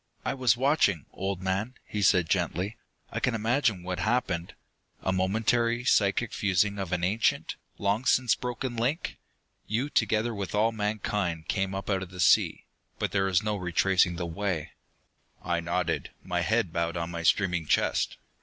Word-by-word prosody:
"I - - 0
was 125 -4 +2
watching, 125 - +2
old 95 -1 -3
man," 100 +7 -1
he 105 - -4
said 90 -3 +4
gently. 90 +3 -1 0.4
"I - - -2
can 130 - +1
imagine 115 -3 +1
what 90 -1 -3
happened. 95 -4 -1 0.5
A 95 - +1
momentary, 115 +5 +1
psychic 105 0 +2
fusing 100 +1 +1
of 95 -3 -4
an 90 -1 -1
ancient, 105 +5 +1 0.2
long 100 +5 0
since 125 -2 +4
broken 125 0 -4
link. 125 +8 -1 0.5
You, 125 +7 -1
together 110 +2 +1
with 100 -1 -4
all 110 +2 +3
mankind, 105 -6 -2
came 95 -1 -1
up 95 - -5
out 95 -2 0
of 95 - -6
the 90 0 -11
sea. 90 - +3 0.3
But - - -1
there 95 -1 +1
is 95 -1 +2
no 105 0 0
retracing 90 -1 +2
the 85 0 -3
way." 85 -2 -3 0.7
I 85 -1 0
nodded, 85 0 -1
my - - -1
head 85 - +1
bowed 85 0 -1
on 85 0 -3
my 85 -1 -4
streaming 90 -2 +2
chest. - - +1
100 Hz, 165 wpm, -28 LUFS, 90-115 Hz, 0.7 s, said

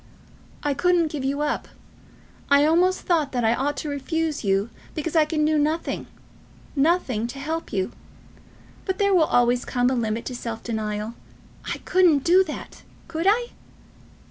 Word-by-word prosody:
"I 290 -1 +1
couldn't 345 0 +2
give 290 -3 -4
you 280 +2 -1
up. 300 - -1 0.8
I 280 +1 +6
almost 355 +4 +3
thought 315 -6 0
that 245 -2 0
I 225 - +4
ought 280 +4 -1
to - - -4
refuse 305 +2 -2
you 200 +2 +1 0.2
because 315 +1 -3
I 315 -1 +5
can 305 0 0
do 310 0 +2
nothing, 310 +3 -1 0.7
nothing 275 -7 +1
to 250 - -8
help 315 +4 -4
you. 190 -2 -1 0.9
But 380 -1 -1
there 400 -1 +2
will 340 -4 +5
always 245 -1 +2
come 250 0 +1
a - - +1
limit 230 -2 -1
to 255 - -5
self 230 -2 -5
denial. 215 -1 -3 0.6
I - - -2
couldn't 350 -7 +4
do 365 +3 +5
that! 305 - -8 0.3
Could 335 +2 -2
I?" 475 +3 +2
295 Hz, 165 wpm, -24 LUFS, 245-330 Hz, 0.9 s, I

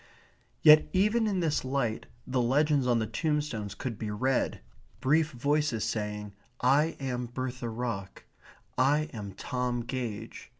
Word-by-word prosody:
Yet 155 0 +8
even 210 +4 +3
in 195 -3 0
this 155 -3 0
light 130 -4 -1 0.2
the 130 -1 0
legends 140 +2 +2
on 120 -1 +3
the 110 - 0
tombstones 125 - -2
could 115 -5 -5
be 110 - -3
read, 125 +5 0 0.4
brief 155 +3 +3
voices 140 -2 0
saying, 105 -1 -3 0.3
"I 145 +6 +3
am 125 -3 -3
Bertha 125 0 -4
Ruck," 110 -5 -4 0.6
"I 150 +4 +3
am 100 -4 -6
Tom 125 +4 -2
Gage." 115 -3 -5
130 Hz, 135 wpm, -29 LUFS, 115-150 Hz, 0.6 s, Yet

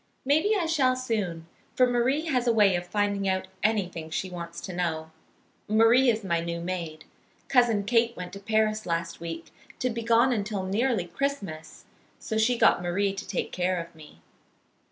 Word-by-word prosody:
Maybe 315 +10 +3
I 365 -5 0
shall 275 -6 +2
soon, 210 -10 -3 0.3
for 255 - +5
Marie 250 +5 +1
has 250 -6 0
a - - +5
way 205 -4 +4
of 175 0 -3
finding 200 0 0
out 190 0 -1
anything 180 -7 -1
she 185 +3 -3
wants 170 -1 -7
to 185 - -6
know. 160 -3 -2 0.6
Marie 225 +4 +5
is 220 -2 0
my 170 -3 0
new 170 0 -3
maid. 170 -3 -5 0.4
Cousin 240 -5 +3
Kate 230 +2 +2
went 180 -1 -7
to 195 - -7
Paris 215 +1 0
last 170 0 -2
week, 165 0 -7 0.2
to 255 - -1
be 230 +1 -4
gone 235 +3 +4
until 205 -3 -2
nearly 210 +1 0
Christmas, 175 - -4 0.3
so 220 - -5
she 240 +2 +3
got 175 - +4
Marie 195 +3 0
to 195 - -7
take 185 -2 -3
care 180 0 0
of 170 0 -8
me. 150 - -16
200 Hz, 175 wpm, -27 LUFS, 175-235 Hz, 0.6 s, for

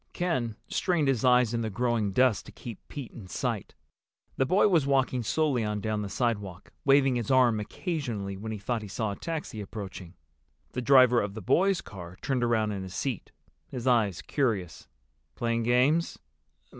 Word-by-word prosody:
Ken 130 - -1
strained 170 -5 +1
his 130 -5 +1
eyes 125 -2 +4
in 115 - 0
the 110 - -2
growing 115 -1 0
dusk 125 +1 +2
to - - -11
keep 115 -5 -9
Pete 140 -5 -7
in 100 -5 -11
sight. 90 - -3 0.6
The 135 - +1
boy 190 +7 +4
was 165 -8 +3
walking 130 -2 +2
slowly 135 0 +1
on 105 -1 -2
down 105 +1 -2
the 100 - -4
sidewalk, 100 -6 -3
waving 135 -2 +4
his 115 - -3
arm 125 -4 +4
occasionally 110 - -4
when 110 +3 -6
he 110 - -4
thought 115 +3 -2
he 105 - -7
saw 105 +1 -2
a - - -4
taxi 155 -9 -5
approaching. 95 -4 -8 0.6
The 125 - -3
driver 125 -1 +6
of 100 0 -4
the 110 - -6
boys' 190 - +3
car 90 -2 -10
turned 130 -3 -1
around 110 -3 +1
in 100 -2 -4
his 95 0 -7
seat, 130 -7 -3 0.4
his 125 -2 -6
eyes 110 -8 +2
curious. 110 - -2 0.5
"Playing 115 0 0
games?" 125 +8 +2
120 Hz, 180 wpm, -28 LUFS, 105-135 Hz, 0.6 s, driver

